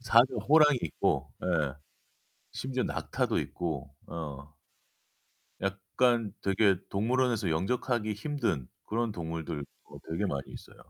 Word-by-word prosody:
사자, 120 Hz, 0 st, +6 dB, 0.2 s
호랑이도 150 Hz, -, +6 dB
있고. -, -, 0 dB
예. 75 Hz, -7 st, +1 dB, 0.8 s
심지어 130 Hz, -1 st, -2 dB
낙타도 -, -, 0 dB
있고, 70 Hz, -6 st, -3 dB
어. 75 Hz, -3 st, -6 dB, 1.1 s
약간 100 Hz, +3 st, +1 dB
되게 100 Hz, 0 st, +4 dB
동물원에서 115 Hz, -1 st, +2 dB
영접하기 110 Hz, +6 st, 0 dB
힘든 105 Hz, -, -1 dB, 0.2 s
그런 115 Hz, 0 st, 0 dB
동물들 80 Hz, -4 st, -4 dB, 0.2 s
어, -, -, -13 dB
되게 85 Hz, +6 st, 0 dB
많이 70 Hz, -7 st, -1 dB
있어요. -, -, -11 dB
100 Hz, 255 characters per minute, -30 LUFS, 80-120 Hz, 1.1 s, 사자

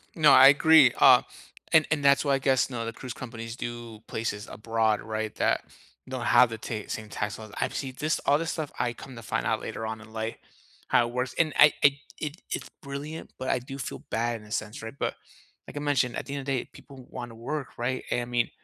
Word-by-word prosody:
No, 155 Hz, -2 st, +6 dB
I 130 Hz, +1 st, +9 dB
agree, 145 Hz, -1 st, +7 dB
uh, 130 Hz, -2 st, +8 dB, 0.5 s
and 155 Hz, -1 st, +6 dB
and 150 Hz, -2 st, +1 dB
that's 140 Hz, 0 st, +5 dB
why, 140 Hz, -, +3 dB
I -, -, -1 dB
guess, 135 Hz, -1 st, +2 dB
know, 120 Hz, -3 st, -4 dB
the 115 Hz, -, -4 dB
cruise 125 Hz, +1 st, -7 dB
companies 115 Hz, -2 st, -7 dB
do 120 Hz, -2 st, -6 dB
places 105 Hz, -2 st, -3 dB
abroad, 110 Hz, -1 st, 0 dB
right, 110 Hz, -1 st, -3 dB
that -, -, +1 dB, 0.5 s
don't -, -, -4 dB
have 125 Hz, -, +6 dB
the 115 Hz, -, -5 dB
ta 110 Hz, -1 st, -5 dB
same 110 Hz, -1 st, -5 dB
tax 105 Hz, 0 st, -3 dB
laws. 110 Hz, -2 st, -10 dB
I've -, -, -1 dB
seen 130 Hz, -1 st, -3 dB
this 155 Hz, +1 st, 0 dB
all 145 Hz, -, +5 dB
this 165 Hz, +1 st, -2 dB
stuff, 155 Hz, -4 st, -4 dB
I 120 Hz, -1 st, 0 dB
come 130 Hz, +2 st, -11 dB
to 115 Hz, -, -9 dB
find 110 Hz, -, -2 dB
out -, -, 0 dB
later 115 Hz, -, -5 dB
on 110 Hz, 0 st, -5 dB
in 110 Hz, 0 st, -15 dB
life, 110 Hz, 0 st, -3 dB, 0.5 s
how 120 Hz, -, +3 dB
it 120 Hz, -, -9 dB
works. 125 Hz, +1 st, -2 dB
And 155 Hz, -2 st, +2 dB
I 150 Hz, 0 st, +8 dB
I 140 Hz, 0 st, +5 dB, 0.2 s
it 150 Hz, +2 st, -5 dB
it's -, -, -4 dB
brilliant, 145 Hz, +3 st, -7 dB
but 130 Hz, -, -4 dB
I -, -, +2 dB
do 135 Hz, +2 st, -8 dB
feel 130 Hz, -, -5 dB
bad 115 Hz, 0 st, -1 dB
in 105 Hz, -, -15 dB
a -, -, -15 dB
sense, 110 Hz, -1 st, -3 dB
right? 110 Hz, +2 st, -7 dB
But, -, -, -2 dB, 0.5 s
like -, -, -9 dB
I -, -, -1 dB
mentioned, 135 Hz, -5 st, +1 dB
at -, -, -4 dB
the 140 Hz, -, -6 dB
end 140 Hz, -, -3 dB
of -, -, -10 dB
day, 135 Hz, -3 st, -1 dB
people 130 Hz, -2 st, -14 dB
wanna 120 Hz, -2 st, -7 dB
work, 135 Hz, +4 st, -5 dB
right? 125 Hz, +2 st, -2 dB
And 120 Hz, -, 0 dB
I -, -, -4 dB
mean, 120 Hz, -1 st, 0 dB
125 Hz, 240 wpm, -27 LUFS, 115-140 Hz, 0.5 s, I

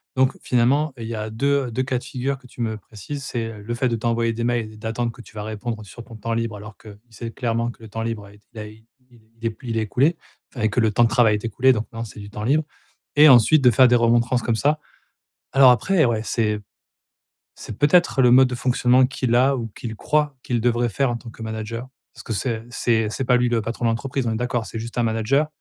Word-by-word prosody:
donc 130 Hz, 0 st, +2 dB
finalement, 130 Hz, +4 st, +2 dB
il 115 Hz, -, -6 dB
y 115 Hz, -, -4 dB
a 110 Hz, 0 st, -5 dB
2- 140 Hz, +2 st, 0 dB
2 130 Hz, +3 st, -1 dB
cas 130 Hz, -1 st, -1 dB
de -, -, -7 dB
figure 135 Hz, +1 st, -3 dB
que 130 Hz, -, -22 dB
tu 125 Hz, -1 st, -10 dB
me 110 Hz, -1 st, -2 dB
précises. 115 Hz, +7 st, -8 dB
C'est 115 Hz, -4 st, -4 dB
le 105 Hz, +3 st, -6 dB
fait 125 Hz, +2 st, 0 dB
de 115 Hz, -, 0 dB
t'envoyer 115 Hz, 0 st, 0 dB
des 115 Hz, +1 st, -4 dB
mails 120 Hz, -2 st, -1 dB
et -, -, -14 dB
d'attendre 115 Hz, +2 st, -3 dB
que 120 Hz, -, -13 dB
tu -, -, -17 dB
vas 105 Hz, -, -5 dB
répondre 110 Hz, +1 st, -5 dB
sur 115 Hz, +3 st, -11 dB
ton 115 Hz, -, -13 dB
temps 115 Hz, +2 st, -4 dB
libre, 115 Hz, -2 st, -2 dB
alors 105 Hz, +1 st, -11 dB
qu'il 105 Hz, -2 st, -13 dB
sait 115 Hz, +1 st, -7 dB
clairement 115 Hz, -1 st, -1 dB
que 115 Hz, -, -20 dB
le 110 Hz, -, -11 dB
temps 115 Hz, +2 st, -4 dB
libre, 115 Hz, -3 st, -4 dB
a 100 Hz, -, -15 dB
été 105 Hz, 0 st, -22 dB
il 110 Hz, -, -9 dB
a 105 Hz, -, -6 dB
i 110 Hz, +1 st, -16 dB, 0.2 s
il 120 Hz, -, -21 dB
est 110 Hz, -2 st, -23 dB
il -, -, -6 dB
est -, -, +1 dB
p 120 Hz, +3 st, -12 dB
il 115 Hz, -, -2 dB
est 110 Hz, -, +1 dB
écoulé, 135 Hz, -, +1 dB, 0.4 s
enfin, 110 Hz, -3 st, +1 dB
que 110 Hz, -, -1 dB
le 110 Hz, -2 st, +3 dB
temps 120 Hz, +3 st, +3 dB
de 115 Hz, -, +3 dB
travail 120 Hz, -2 st, +4 dB
est 105 Hz, -, -5 dB
écoulé. 130 Hz, +4 st, +3 dB
Donc 110 Hz, -1 st, -3 dB
non, 115 Hz, 0 st, -5 dB
c'est 110 Hz, -, -10 dB
du 100 Hz, 0 st, -9 dB
temps 105 Hz, 0 st, -7 dB
libre, 150 Hz, +6 st, +2 dB, 0.5 s
et 150 Hz, +1 st, +8 dB
ensuite, 135 Hz, +4 st, +6 dB
de 125 Hz, -, +7 dB
faire 130 Hz, +3 st, +6 dB
des 125 Hz, -, +4 dB
remontrances 120 Hz, +1 st, +2 dB
comme 115 Hz, -, 0 dB
ça. 150 Hz, +6 st, +1 dB, 0.7 s
Alors 135 Hz, -1 st, +7 dB
après, 170 Hz, +5 st, +2 dB
ouais, 110 Hz, -2 st, 0 dB
c'est 105 Hz, -2 st, 0 dB, 1.0 s
c'est 105 Hz, -, -9 dB
peut-être 150 Hz, 0 st, +3 dB
le 125 Hz, -, +5 dB
mode 130 Hz, +1 st, +6 dB
de 125 Hz, -, -4 dB
fonctionnement 125 Hz, +1 st, +3 dB
qu'il 130 Hz, -2 st, -2 dB
a, 130 Hz, +2 st, +4 dB
ou 115 Hz, -2 st, -4 dB
qu'il 110 Hz, +2 st, -8 dB
croit 150 Hz, +2 st, 0 dB
qu'il 120 Hz, -2 st, -1 dB
devrait 120 Hz, 0 st, +1 dB
faire 135 Hz, +4 st, 0 dB
en 120 Hz, -, -2 dB
tant 115 Hz, -1 st, -10 dB
que 115 Hz, -, -12 dB
manager. 110 Hz, +2 st, -5 dB, 0.2 s
Parce -, -, -12 dB
que 115 Hz, -, -4 dB
c'est 115 Hz, 0 st, -2 dB
c'est 115 Hz, -3 st, +1 dB
c'est 130 Hz, +5 st, -3 dB
pas 125 Hz, 0 st, +3 dB
lui 125 Hz, 0 st, +2 dB
le 115 Hz, -2 st, 0 dB
patron 115 Hz, +1 st, -3 dB
de -, -, +3 dB
l'entreprise, 125 Hz, +2 st, -2 dB
on 115 Hz, -, 0 dB
est 110 Hz, -, -2 dB
d'accord? 120 Hz, -2 st, -2 dB
C'est 115 Hz, -, -6 dB
juste 115 Hz, +2 st, -6 dB
un -, -, +3 dB
manager, 115 Hz, +7 st, +1 dB
115 Hz, 265 wpm, -22 LUFS, 110-125 Hz, 1.0 s, et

